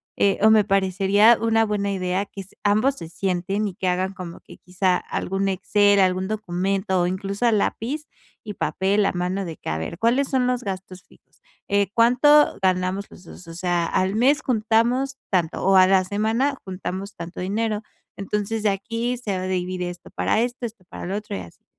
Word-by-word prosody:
eh, 200 -1 +2
o 220 - +7
me 215 -1 +6
parecería 195 +3 +4
una 225 0 +3
buena 205 -1 -1
idea 185 0 -1
que 200 - -9
s 195 - -15
ambos 215 +7 +2
se 165 - -8
sienten 195 +3 -1
y 190 - -5
que 185 - -3
hagan 185 +2 0
como 180 -3 -9
que - - -15
quizá 180 0 0
algún 195 +1 -3
Excel, 200 +1 +3
algún 185 0 +1
documento 190 -2 -1
o 175 - +1
incluso 195 +5 -1
a - - +4
lápiz 245 +7 -1 0.4
y 210 - -6
papel, 195 +5 0
a - - +1
mano, 180 +2 -2
de 165 -3 -7
que: - - -7
"A 80 - -1
ver, 120 - -5
¿cuáles 250 +5 +2
son 260 -2 +1
los 250 0 0
gastos 190 -1 -6
fijos?". - - -26 0.3
Eh, 200 -1 +2
"¿cuánto 255 +6 +5
ganamos 185 +1 0
los 180 - -14
dos?", 175 0 -13
o 165 - -9
sea, 175 -1 0
al 185 +4 0
mes 275 +7 +3
juntamos 240 +4 +1
tanto, 175 -3 0
o 195 0 +4
a 185 - +8
la 190 -1 +4
semana 225 +8 0
juntamos 190 +1 -5
tanto 170 +1 -8
dinero. 210 +3 -1 0.3
Entonces, 210 +2 -2
de 210 - +3
aquí 230 +5 -2
se 205 -6 -3
va 185 - -4
a - - -3
dividir 180 0 -2
esto 175 0 -9
para 220 - 0
esto, 245 +1 -2
esto 215 -5 -8
para - - -7
lo 190 - -3
otro 210 - -5
y - - -5
así. 85 -2 -14
195 Hz, 200 wpm, -23 LUFS, 185-220 Hz, 0.4 s, a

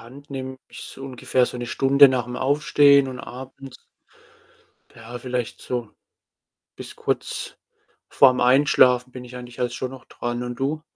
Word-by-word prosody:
Hand 135 +5 -14
nehme 130 -1 -6
ich's - - -11
ungefähr 130 -1 -1
so - - -6
1 120 0 -5
Stunde 135 +4 +5
nach'm 125 -1 -2
Aufstehen 140 0 +4
und 130 -1 -7
abends, 130 +1 -10 1.2
ja, 120 +1 -9
vielleicht 125 -2 -4
so 120 -4 -4 0.9
bis - - -10
kurz - - -4 0.5
vorm 130 -2 +5
Einschlafen 125 -1 +4
bin 125 -1 -9
ich 125 0 -11
eigentlich 125 -1 -10
halt 125 -1 -1
schon 130 +1 -5
noch 130 - -12
dran, 120 0 -5
und 120 0 -5
du? 150 +3 -2
125 Hz, 150 wpm, -23 LUFS, 125-135 Hz, 1.2 s, Stunde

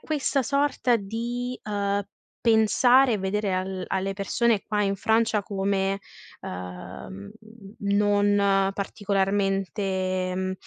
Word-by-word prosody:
questa 285 -3 0
sorta 275 -1 +1
di, 235 +4 -4
uhm, 200 -1 -1 0.4
pensare 245 +3 +5
e 210 - -1
vedere 195 +1 -1
al 185 0 -3
alle 195 +1 -1
persone 210 +2 +1
qua 210 -1 -1
in 195 -1 0
Francia 220 +1 +2
come, 195 0 -1 0.4
uhm, 90 +2 -8 0.5
non 200 -1 +2
particolarmente, 195 -2 -1
mhmm, 185 0 -1
200 Hz, 100 wpm, -25 LUFS, 195-220 Hz, 0.5 s, pensare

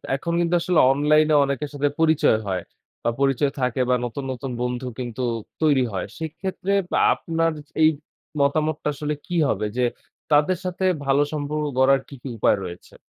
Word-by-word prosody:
এখন 170 +5 -3
কিন্তু 175 0 +2
আসলে 180 -1 +2
অনলাইনে 150 +2 +3
অনেকের 140 +1 -2
সাথে 145 0 +1
পরিচয় 160 -8 +4
হয়। 95 -2 -1 0.4
বা - - +2
পরিচয় 140 +1 +2
থাকে 125 0 0
বা 125 - +4
নতুন, 120 +4 -5
নতুন 130 +1 -5
বন্ধু 125 +1 -2
কিন্তু 125 0 -5 0.4
তৈরি 145 -4 +4
হয়। 95 - -2
সেক্ষেত্রে 170 +4 -4 0.2
বা - - +1 0.2
আপনার 165 0 -1 0.3
এই 155 - +7 0.5
মতামতটা 150 +2 +1
আসলে 150 +1 -3
কি 175 - -3
হবে? 105 +1 0
যে 125 - +2 0.5
তাদের 150 +5 +4
সাথে 185 +1 -3 0.2
ভালো 135 +1 +3
সম্পর্ক 150 0 -2
গড়ার 135 +1 +4
কী, - - -13
কী - - -7
উপায় 105 - +3
রয়েছে? 90 -1 -10
145 Hz, 165 wpm, -23 LUFS, 130-155 Hz, 0.5 s, এই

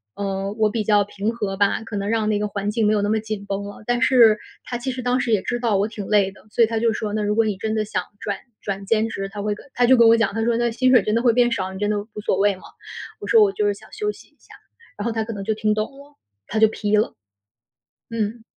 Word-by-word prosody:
嗯， 195 0 -3
我 215 -1 +3
比 215 +1 -2
较 205 -1 +4
平 205 +2 -3
和 205 -4 -3
吧， 200 +2 +1
可 225 -1 -7
能 200 0 -2
让 225 -1 +1
那 210 -1 +1
个 210 - -1
环 205 0 -3
境 220 -1 +1
没 215 - +3
有 210 - +1
那 205 - 0
么 220 +1 +2
紧 215 -2 -5
绷 200 0 -3
了。 205 +1 -10
但 245 +1 0
是 235 -5 +6 0.2
他 240 - -4
其 260 +2 -3
实 255 0 -5
当 250 +1 +1
时 250 -2 -1
也 210 -3 +3
知 240 - -2
道 230 -4 +1
我 200 +2 +1
挺 210 -3 -7
累 200 -2 +3
的， 205 - -20
所 230 - +3
以 - - +4
他 225 0 -1
就 230 0 +2
说： 215 -1 -3
“那 215 - 0
如 210 0 0
果 225 0 +3
你 210 -2 -1
真 215 +3 -3
的 215 -1 0
想 210 - -2 0.2
转 205 -3 -3 0.2
转 195 -1 -4
兼 220 +2 +2
职” 195 -3 -4
他 205 0 -6
会 210 0 0
跟 210 - -13
他 245 - +3
就 260 +2 +6
跟 235 -2 +6
我 230 0 +6
讲， 225 -3 +1
他 225 +1 -1
说： 230 0 +1
“那 240 0 +1
薪 255 +3 +2
水 245 -6 +6
真 210 - -1
的 230 - +2
会 240 -2 +4
变 240 0 +3
少， 190 -4 -2
你 190 - -8
真 205 0 0
的 210 - 0
无 205 - -13 0.2
所 - - +2
谓 200 0 +3
吗？” 185 - -16 0.6
我 - - -6
说： 450 -2 +6
“我 405 - +3
就 420 +1 0
是 410 - +2
想 - - -16
休 420 -1 -1
息 - - -16
一 - - -36
下。” - - -17 0.4
然 205 - -4
后 235 - 0
他 225 -1 -1
可 225 +1 -6
能 200 -2 -6
就 220 - 0
听 215 0 0
懂 215 0 -2
了， 285 +1 -16 0.3
他 220 - -3
就 220 - +7
批 210 -1 0
了。 215 - +1 1.0
嗯。 225 0 -3
215 Hz, 325 characters per minute, -22 LUFS, 205-230 Hz, 1.0 s, 就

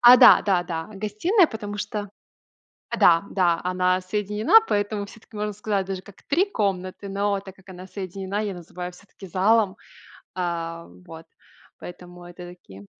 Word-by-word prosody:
А, 245 +1 +10
да, - - +8
да, 190 -4 +2
да, 165 -2 -4
гостиная, 215 - +2
потому 210 -5 -6
что 210 -2 -4 0.8
а, - - -3
да, 170 +1 +5
да, 175 -3 +2
она 185 0 +1
соединена, 210 - +3
поэтому 205 0 -1
всё-таки, 220 +1 -15
можно 210 0 -2
сказать, 200 -1 -2
даже 190 -1 -4
как 200 0 -17
три 355 +8 +2
комнаты, 195 - -2
но 200 0 0
так 190 -1 -12
как 195 0 -22
она 185 0 -10
соединена, 195 +1 -4
я 205 -2 -3
называю 180 +1 -7
всё-таки 195 +2 -14
залом, 200 +2 +2 0.6
а, 170 -2 -3 0.2
вот. 165 - -11 0.5
Поэтому 175 0 -11
это 175 0 -10
такие. 100 - -14
195 Hz, 155 wpm, -24 LUFS, 180-210 Hz, 0.8 s, А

